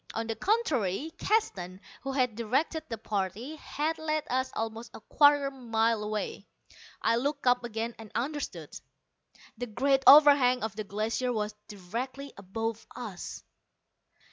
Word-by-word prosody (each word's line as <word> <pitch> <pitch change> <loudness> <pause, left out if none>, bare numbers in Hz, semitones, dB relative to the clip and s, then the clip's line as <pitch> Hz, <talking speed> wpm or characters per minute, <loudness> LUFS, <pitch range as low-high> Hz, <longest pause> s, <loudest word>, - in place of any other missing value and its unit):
On 225 - -1
the 225 0 -3
contrary, 300 - 0
Keston, 190 - 0 0.2
who 270 - -4
had 255 -4 +1
directed 265 +8 0
the 230 - -3
party, 215 - -3
had 315 +2 -2
led 310 -1 -1
us 260 +1 +1
almost 225 +1 -4
a - - -8
quarter 285 +4 +4
mile 230 -4 0
away. 210 -1 -4 0.6
I 230 +1 +3
looked 285 +3 -2
up 245 0 +4
again, 230 0 -3
and 220 -1 -10
understood. 290 +4 -3 0.9
The 245 - -3
great 270 +5 +2
overhang 280 -4 +8
of 220 -3 -3
the 215 -1 -4
Glacier 220 +5 -1
was 210 -2 -2
directly 240 +8 -6
above 225 +3 -4
us! 215 -8 -7
240 Hz, 140 wpm, -29 LUFS, 220-280 Hz, 0.9 s, overhang